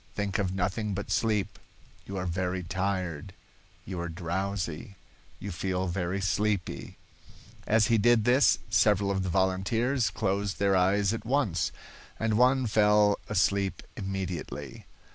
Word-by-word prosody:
Think 100 -2 -1
of 95 -3 0
nothing 95 +2 -2
but 100 - -5
sleep. 105 -3 0 0.5
You 95 - -5
are 90 - -2
very 90 +1 -2
tired. 95 -1 -3 0.5
You 90 -2 -5
are 85 0 -3
drowsy. 90 +1 -3 0.4
You 100 +4 -6
feel 90 +2 -2
very 90 +1 -2
sleepy." 100 0 -1 0.7
As 110 0 +4
he 115 0 +3
did 115 0 +4
this, 130 +3 +5
several 105 -1 +3
of 95 -1 0
the 95 - -2
volunteers 95 +8 +1
closed 100 -2 -1
their 100 -1 +2
eyes 95 +3 +2
at 115 - -4
once, 120 - 0 0.5
and 110 -1 +1
one 130 +2 +4
fell 105 -1 +4
asleep 95 0 +1
immediately. 90 -7 -5
100 Hz, 135 wpm, -28 LUFS, 95-105 Hz, 0.7 s, this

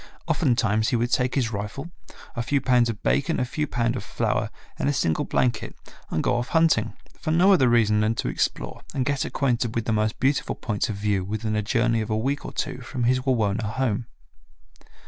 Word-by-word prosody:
Often 125 - +2
times 110 -1 +1
he - - +1
would 120 +1 0
take 125 -1 +1
his 120 -5 +1
rifle, 110 +10 -5 0.4
a 120 - -1
few 140 +4 +1
pounds 125 -3 +3
of 110 -3 -5
bacon, 160 +4 +1
a - - +1
few 150 +4 -2
pound 115 -1 0
of - - -4
flour, - - -1 0.3
and - - +1
a - - +1
single 80 - 0
blanket 120 -3 0 0.3
and 80 - -1
go - - +2
off 120 +1 -2
hunting, 160 +1 +2 0.3
for 155 - -4
no 175 +5 +5
other 135 -9 +4
reason 110 -3 +3
than 110 +1 +1
to - - -2
explore - - -2
and 130 -2 0
get 140 0 0
acquainted 120 -4 0
with 115 -1 -1
the 115 - 0
most 110 0 0
beautiful 135 +2 +1
points 105 -1 -2
of 105 - -2
view 100 -2 0
within 110 +2 -2
a 105 - +1
journey 115 +2 +1
of 110 - -4
a 110 - +1
week 135 +6 -1
or - - -5
two 125 - -3
from 125 0 -4
his 130 +2 +3
Wawona 110 -5 +1
home. 120 -3 -1
120 Hz, 215 wpm, -25 LUFS, 110-130 Hz, 0.4 s, no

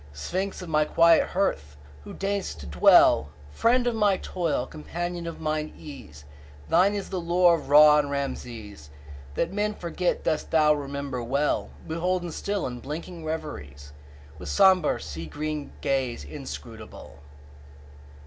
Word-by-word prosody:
Sphinx 185 - -4
of - - -8
my 155 -1 +2
quiet 165 +1 +4
hearth! 75 - -2 0.3
who - - -8
deign'st 195 - -3
to 70 - -9
dwellFriend 75 - +3
of 240 - +1
my 205 -3 +2
toil, 170 -6 -2
companion 175 +2 -5
of 165 - -7
mine 155 -1 -2
ease, 125 - -11 0.4
Thine 190 +5 +4
is 200 -1 -5
the 185 - -2
lore 175 +1 +4
of 165 - -3
Ra 150 +1 +8
and 145 -1 -1
Rameses; 115 - -5 0.5
That 170 +3 -1
men 210 +1 -1
forget 175 0 -2
dost 155 - -1
thou 155 -2 +4
remember 140 -3 -4
well, 140 +5 0 0.2
Beholden 175 +2 -1
still 200 +4 -3
in 125 -1 -5
blinking 160 +5 -7
reveriesWith 75 - -6 0.6
sombre, 180 - +4
sea 80 +2 -7
green 150 - -5
gaze 130 - -1
inscrutable. 70 0 -9
155 Hz, 135 wpm, -26 LUFS, 125-180 Hz, 0.6 s, Ra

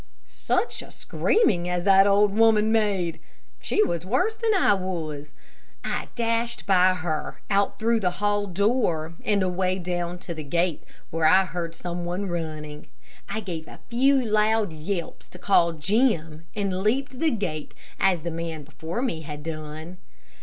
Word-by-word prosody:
Such 475 - -1
a - - -11
screaming 185 - +1
as 180 -1 -1
that 195 0 +6
old 200 0 +4
woman 220 -1 +4
made! 200 -7 +1 0.4
She 425 - +2
was 170 -1 -2
worse 270 - +1
than 455 -1 0
I 360 - +4
was. 160 -6 -4 0.5
I - - -2
dashed 230 0 -1
by 185 -1 +4
her, 160 -3 -3
out 200 0 +2
through 230 +1 +2
the 185 -4 +1
hall 205 0 +1
door, 185 -5 0
and 205 -2 +2
away 185 0 0
down 175 -1 -3
to 175 -1 -6
the 160 - -6
gate, 170 +3 0 0.3
where 165 0 0
I 190 +3 +6
heard 170 -1 -5
some 175 0 -4
one 180 +3 -2
running. 155 -3 -5 0.4
I 215 +2 -2
gave 170 -6 -6
a - - -12
few 270 +3 +4
loud 215 -3 +2
yelps 170 +3 -5
to - - -12
call 175 -2 +3
Jim, 165 - 0
and 195 -3 -1
leaped 255 +5 0
the 325 - +3
gate 175 - -3 0.2
as 185 -4 +3
the 170 +1 -4
man 165 -2 -5
before 160 - -5
me 165 -12 -2
had 150 -1 -8
done. 155 +2 -7
185 Hz, 160 wpm, -25 LUFS, 165-215 Hz, 0.5 s, that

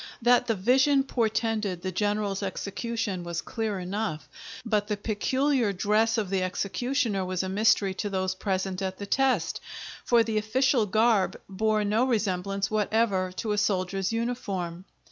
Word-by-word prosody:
That 245 +1 +4
the 225 - +1
vision 265 +7 +3
portended 220 -6 -1
the 185 - -2
general's 205 +1 -1
execution 200 0 -3
was 170 -1 -4
clear 220 -3 -3
enough, 185 -3 -3 0.4
but 210 -2 0
the 210 -1 -1
peculiar 245 +3 +1
dress 215 +4 +2
of 205 -4 -2
the 190 -1 +1
executioner 205 +3 -1
was 185 0 -2
a 190 - -3
mystery 200 -1 +3
to 205 +2 -3
those 190 -1 -1
present 190 -1 -2
at 190 -1 -3
the 200 - -6
test, 245 -6 +1 0.4
for 235 -2 +4
the 220 -1 0
official 245 +1 +2
garb 215 0 +2
bore 215 +2 0
no 215 +4 +2
resemblance 200 -4 -1
whatever 210 -3 +1
to 215 +3 -3
a 210 - +1
soldier's 195 -1 0
uniform. 200 -7 -3
210 Hz, 150 wpm, -27 LUFS, 190-225 Hz, 0.4 s, That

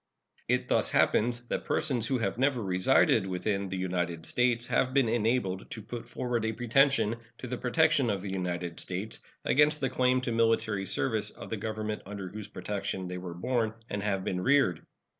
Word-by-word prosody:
It - - +1
thus - - +2
happens 120 +2 +2
that - - -2
persons 120 -6 0
who 130 - +1
have 115 0 -2
never 130 -3 +2
resided 95 0 +3
within 100 +1 -1
the 95 - -3
United 90 -3 -2
States 120 -1 +2
have 130 +2 +1
been 135 -4 +4
enabled 110 -4 0
to 110 - -7
put 120 +1 -7
forward 120 -2 -2
a 110 0 0
pretension 120 -1 +3 0.2
to - - -8
the 125 0 -4
protection 145 0 +3
of 100 -2 -1
the 100 - -4
United 90 -2 -3
States 95 +4 -3 0.3
against 150 +2 +4
the 135 -2 -1
claim 130 0 +3
to 125 - -2
military 115 -3 +1
service 105 +2 +1
of - - -11
the 110 - -1
government 110 0 -3
under 100 -2 -6
whose 105 +1 -7
protection 100 -3 -4
they 90 0 -5
were 90 -1 -7
born 110 +3 -1 0.2
and 105 - -2
have 100 -2 -1
been 90 -1 -2
reared. 130 - +3
110 Hz, 185 wpm, -29 LUFS, 95-125 Hz, 0.3 s, been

